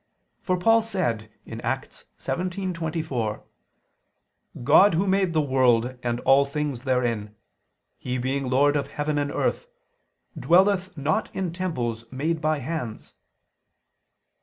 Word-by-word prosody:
For 185 -1 0
Paul 225 +5 +4
said 155 - -2 0.2
(Acts - - -5
17:24): 165 - -3 1.2
"God 165 +9 +6
Who 185 +5 +1
made 190 -1 +2
the 155 -1 +2
world 130 -3 +2
and 120 -1 -1
all 135 +1 +5
things 140 -3 -4
therein; 120 -5 -1 0.6
He 125 0 -3
being 130 +1 -2
Lord 145 +3 +3
of 140 -2 0
heaven 145 +1 -2
and 145 0 -1
earth, 485 - -1 0.7
dwelleth 185 0 +2
not 145 +3 0
in 185 -3 -2
temples 120 -11 -3
made 155 +5 -1
by 155 0 +1
hands." 130 -5 -5
145 Hz, 115 wpm, -25 LUFS, 125-175 Hz, 1.2 s, God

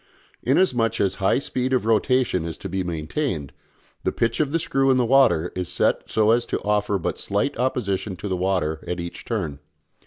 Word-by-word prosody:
Inasmuch 125 - +2
as 95 -1 +2
a - - -13
high 95 - +3
speed 130 -1 -1
of 125 - +1
rotation 115 -3 +2
is 85 -1 -5
to - - -6
be 95 +1 -2
maintained, 85 - -3 0.5
the - - +1
pitch 115 0 -1
of 150 -3 +1
the 165 - +2
screw 135 -4 +1
in 130 - +4
the 125 - +3
water 120 -10 +4
is 90 -1 -3
set - - 0
so 110 0 +3
as 120 +1 +2
to - - -1
offer 105 -1 +1
but 90 - -3
slight 100 +8 -1
opposition 105 -6 -1
to 95 - -6
the 95 - -1
water 90 -4 -1
at 90 0 -3
each 85 0 -6
turn. 85 -12 -3
105 Hz, 205 wpm, -23 LUFS, 90-125 Hz, 0.5 s, in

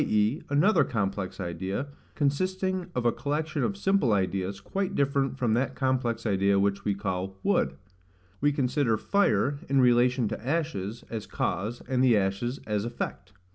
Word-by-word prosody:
e., 110 +7 +2
another 160 +4 +4
complex 100 -8 -2
idea, 95 - -3 0.3
consisting 185 +5 0
of 125 -1 -1
a 120 - +5
collection 150 +4 -2
of 200 - -1
simple 195 - +2
ideas, 95 0 -1
quite 195 - -3
different 140 -1 +1
from 120 -4 +1
that 125 +4 0
complex 125 -3 0
idea 100 -1 +2
which 100 0 +1
we 100 -1 0
call 95 -1 -3
wood; - - +2 0.7
we 145 +1 +4
consider 130 -4 +1
fire, 145 - +1
in 135 0 +3
relation 125 -1 +4
to 110 +1 -5
ashes, 130 - -2
as 110 -2 -4
cause, 110 +7 -2
and 130 -1 +1
the 120 -4 +5
ashes, 100 +7 -1
as 105 -1 -1
effect. 105 -5 -5
120 Hz, 155 wpm, -28 LUFS, 100-145 Hz, 0.7 s, a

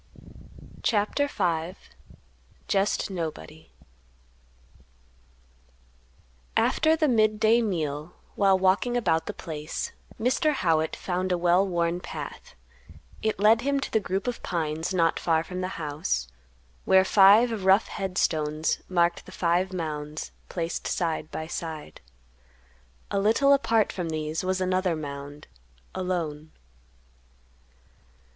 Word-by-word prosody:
CHAPTER 220 +7 +1
V. 175 - -1 0.9
"JEST 195 0 0
NOBODY." 160 -3 -6 2.9
After 315 0 +3
the 310 -1 +2
midday 220 -1 +3
meal, 160 -6 -3 0.2
while 195 -2 +4
walking 190 +6 +2
about 165 -8 +1
the - - -3
place, 155 -1 -5 0.3
Mr. 265 +7 +2
Howitt 160 - +1
found 185 0 -2
a 180 - +2
well 175 +2 +3
worn 170 -1 0
path; - - -8 0.7
it 220 0 0
led 220 +3 +5
him 280 +2 +1
to - - -5
the 220 - +3
group 190 -1 -3
of 245 -1 -3
pines 160 -1 -2
not 165 -3 +2
far 160 -1 +1
from 180 +2 -6
the 185 - -1
house, 150 - -2 0.6
where 190 0 +5
five 210 +3 +5
rough 190 +3 +4
head 190 -3 -4
stones 155 0 0
marked 175 -1 +1
the - - -10
five 180 +2 +1
mounds 155 -4 -5 0.2
placed 170 -1 -3
side 165 -2 -2
by 160 - -5
side. 160 - -6 1.1
A 200 - +1
little 230 +8 +4
apart 225 -6 +2
from 175 -3 -3
these 155 +1 -3
was 185 0 0
another 185 -1 +1
mound, 145 -1 -7 0.5
alone. 165 -5 -3
180 Hz, 115 wpm, -26 LUFS, 160-205 Hz, 2.9 s, led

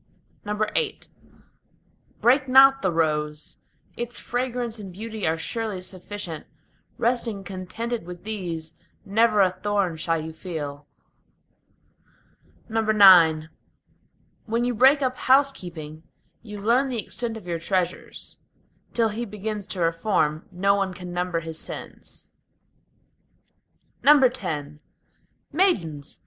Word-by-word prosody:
VIII 215 - -1 1.2
Break 260 +3 +4
not 270 +1 +7
the 190 - +1
rose; 150 -2 -1 0.4
its 240 0 -4
fragrance 245 -2 -2
and 195 -3 -8
beauty 215 +1 -4
are 160 +1 +1
surely 220 +2 -3
sufficient: 185 -2 -7 0.5
Resting 230 -4 -1
contented 195 +3 -5
with 180 -1 -9
these, 175 -7 -5 0.3
never 215 +1 +3
a 185 -2 +4
thorn 190 -2 -1
shall 165 +1 0
you 160 +1 -6
feel. 150 -4 -6 1.8
IX 190 -8 +6 1.0
When 230 +2 0
you 245 - 0
break 265 +5 +5
up 255 -1 -1
housekeeping, 175 - +1 0.4
you 210 -2 -9
learn 240 +7 +2
the 250 - -2
extent 230 +1 -3
of 210 - -12
your 170 -2 -3
treasures; 180 +1 -3 0.6
Till 230 -2 +3
he 220 +3 -3
begins 210 -1 -5
to 185 - -4
reform, 165 -2 0
no 195 +2 +2
one 195 -2 -1
can 180 -1 -8
number 175 -1 -1
his 160 -1 -6
sins. - - -9 1.8
X 250 - +4 0.8
Maidens! 170 - 0
200 Hz, 110 wpm, -24 LUFS, 170-235 Hz, 1.8 s, not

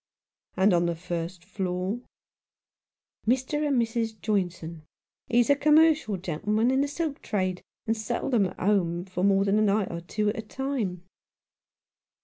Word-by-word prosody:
"And 190 +1 +4
on 175 0 +3
the 170 - -1
first 175 +1 -5
floor?" 190 +2 -2 1.3
"Mr. 260 +5 +1
and 275 -4 +2
Mrs. 225 -1 -1
Joynson. 175 -6 -2 0.5
He's 240 +3 +3
a - - +6
commercial 300 -7 +4
gentleman 210 +7 0
in 265 +1 +2
the 285 - +1
silk 300 0 -3
trade, 185 -3 -1 0.2
and 225 - +1
seldom 220 0 0
at - - -11
home 180 -3 +1
for 185 -1 -4
more 195 0 +4
than 200 +2 +3
a - - +3
night 205 -1 +2
or 170 0 -5
two 210 +4 -1
at 225 +2 -3
a - - -1
time." 265 +5 -6
95 270 -7 0
Rough 180 - -6
Justice. 180 0 -19
210 Hz, 165 wpm, -27 LUFS, 180-240 Hz, 1.3 s, a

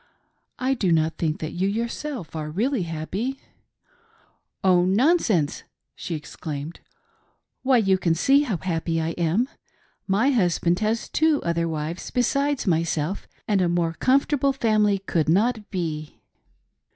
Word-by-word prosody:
I 260 +1 +1
do 200 -9 0
not 160 -1 +1
think 155 -2 -1
that 155 - -3
you 185 +2 -1
yourself 230 - -4
are 155 -1 -4
really 230 - 0
happy." 200 - -3 0.6
" - - -38
Oh, 180 -2 +5
nonsense 205 - +2 0.2
!" - - -57
she 170 - -4
exclaimed. 150 0 -6 0.4
" - - -45
Why 260 -1 +4
you 195 -4 +3
can 170 -3 +1
see 275 - +4
how 235 -11 -1
happy 165 -2 -2
I 160 0 -1
am. 175 +8 0 0.6
My 215 +8 +3
husband 175 -6 +2
has 220 +1 -1
two 315 -2 +2
other 170 0 0
wives, 160 +1 -4
besides 275 +3 0
myself, 165 0 0 0.2
and 205 -3 +2
a 175 - +2
more 170 -1 0
comfortable 275 - +2
family 215 -5 +2
could 170 -5 -1
not 215 +4 +1
be." 155 -5 -4
190 Hz, 145 wpm, -24 LUFS, 165-240 Hz, 0.6 s, Oh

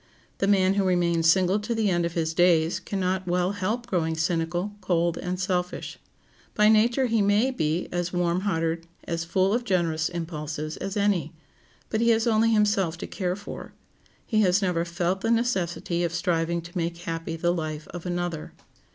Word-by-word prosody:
The 195 - +1
man 190 -1 +4
who 200 0 +1
remains 170 -3 +2
single 190 +3 +2
to 230 +3 -3
the 215 -3 +1
end 175 -1 +1
of 170 - -8
his 160 -1 -1
days 170 0 +3
can 195 +1 -4
not 185 0 -1
well 180 +1 +1
help 205 +5 -2
growing 165 -8 0
cynical, 170 +4 -1
cold, 170 -1 +1
and 180 0 -3
selfish. 180 -2 -2 0.6
By 210 0 +5
nature 235 +4 +4
he 230 -3 +2
may 205 +6 +3
be 160 -7 -1
as 175 0 -2
warm 175 0 +1
hearted, 165 -3 -1 0.2
as 165 -1 -3
full 190 +3 +1
of 240 +1 0
generous 170 -7 0
impulses, 155 -3 -4
as 195 +2 -4
any, 195 -7 +1 0.6
but 220 - 0
he 235 - +3
has 225 0 +3
only 225 -1 +3
himself 205 -6 +2
to - - -6
care 180 -2 -2
for. 205 +1 -9 0.5
He 215 -2 +2
has 185 -1 +4
never 180 -4 0
felt 175 +2 -1
the 225 - -1
necessity 185 -7 0
of 170 -1 -1
striving 170 -1 0
to 170 +1 -12
make 170 -1 -2
happy 165 -2 -4
the 175 +1 +1
life 155 -3 -4
of 175 0 -7
another. 175 -3 -3
180 Hz, 185 wpm, -26 LUFS, 170-200 Hz, 0.6 s, By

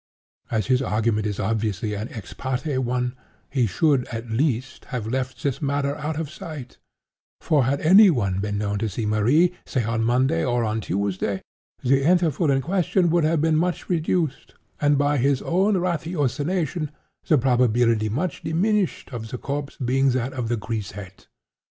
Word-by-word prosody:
As 110 -3 0
his 130 0 +2
argument 110 -3 0
is 105 -2 -4
obviously 105 0 -1
an 105 +3 -4
ex 110 -6 -9
parte 130 +1 -2
one, 125 0 -1 0.4
he 130 -4 +2
should, 135 - +2
at 115 0 -6
least, 130 +1 -1
have 125 -6 -4
left 130 +2 -3
this 140 -4 -1
matter 140 0 0
out 150 +1 -3
of 160 - -2
sight; 150 -6 -9 0.6
for 145 -5 +2
had 140 +3 +1
any 195 +6 +8
one 100 - 0
been 100 0 -2
known 100 -1 -1
to 110 +1 -1
see 110 +3 -3
Marie, 125 +12 +3
say 125 - -1
on 115 +1 -1
Monday, 120 -7 +2
or 120 +3 +1
on 110 0 -1
Tuesday, 100 0 -2 0.4
the 135 +2 +3
interval 165 -2 +2
in 135 -1 +3
question 180 +1 +1
would 170 -1 +3
have 160 -1 +2
been 160 0 +2
much 175 +2 -1
reduced, 165 -3 -1 0.2
and, 145 -1 +3
by 145 +1 +2
his 135 +1 +2
own 195 +4 +2
ratiocination, 165 -1 -1 0.4
the 155 - +5
probability 120 -3 +2
much 155 - -2
diminished 190 +3 0
of 110 -2 -5
the 125 - -4
corpse 140 +2 -4
being 135 +1 +2
that 130 0 -1
of 125 -3 -3
the 120 - 0
grisette. 100 -4 -6
130 Hz, 170 wpm, -24 LUFS, 110-155 Hz, 0.6 s, any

